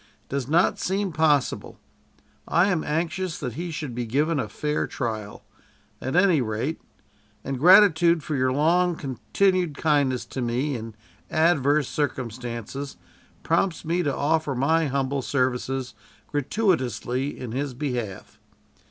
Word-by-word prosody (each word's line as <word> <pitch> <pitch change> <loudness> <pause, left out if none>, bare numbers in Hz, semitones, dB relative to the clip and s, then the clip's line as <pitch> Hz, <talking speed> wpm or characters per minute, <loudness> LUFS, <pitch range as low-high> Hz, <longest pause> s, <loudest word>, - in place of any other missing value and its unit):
"It - - -37
does 135 -2 -2
not 165 +5 +3
seem 195 0 -1
possible. 150 -3 +1 0.7
I 180 +4 +3
am 170 -4 0
anxious 170 +3 -2
that 125 -6 -4
he 170 +7 -4
should 150 -5 -5
be 120 0 -3
given 150 +6 +1
a 110 - -3
fair 150 +8 -2
trial, 110 -5 -4 0.6
at 130 +5 -3
any 180 -5 +4
rate; 120 +7 -2 0.6
and 135 -2 -3
gratitude 175 -2 +6
for 155 - -3
your 130 -1 +2
long 170 +5 +2
continued 170 +4 0
kindness 140 -5 +1
to 130 - -5
me 125 +4 -1
in 115 -2 -7 0.3
adverse 150 -3 +3
circumstances 125 -1 -4 0.5
prompts 165 +1 0
me 170 +3 +1
to 145 -5 -1
offer 155 -1 0
my 160 +5 +2
humble 135 0 -1
services 130 -1 -1 0.4
gratuitously 135 - -1
in 125 -3 -6
his 135 +1 -3
behalf. 120 -8 -4
145 Hz, 135 wpm, -25 LUFS, 125-165 Hz, 0.7 s, gratitude